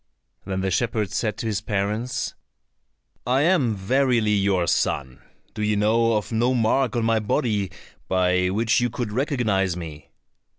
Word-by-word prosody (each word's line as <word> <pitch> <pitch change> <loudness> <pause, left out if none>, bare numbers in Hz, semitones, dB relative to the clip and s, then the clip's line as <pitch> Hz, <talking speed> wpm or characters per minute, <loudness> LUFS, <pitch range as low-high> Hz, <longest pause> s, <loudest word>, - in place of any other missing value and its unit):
Then 95 -1 -2
the 95 0 -1
shepherd 110 +1 0
said 110 -2 -1
to 120 - -5
his 110 -2 -1
parents, 105 +3 -2 0.9
"I 130 +2 +3
am 150 - +2
verily 120 +2 +1
your 100 -3 +2
son. 65 -5 -1 0.3
Do - - -6
you 105 0 +1
know 115 +3 +2
of 105 +1 -2
no 120 +3 +1
mark 120 +1 +1
on 115 -1 0
my 115 -1 +2
body 105 -2 0 0.4
by 90 0 +2
which 110 +4 +2
you 120 0 +1
could 120 -2 -4
recognize 110 - 0
me?" 75 -4 -9
110 Hz, 155 wpm, -23 LUFS, 95-120 Hz, 0.9 s, I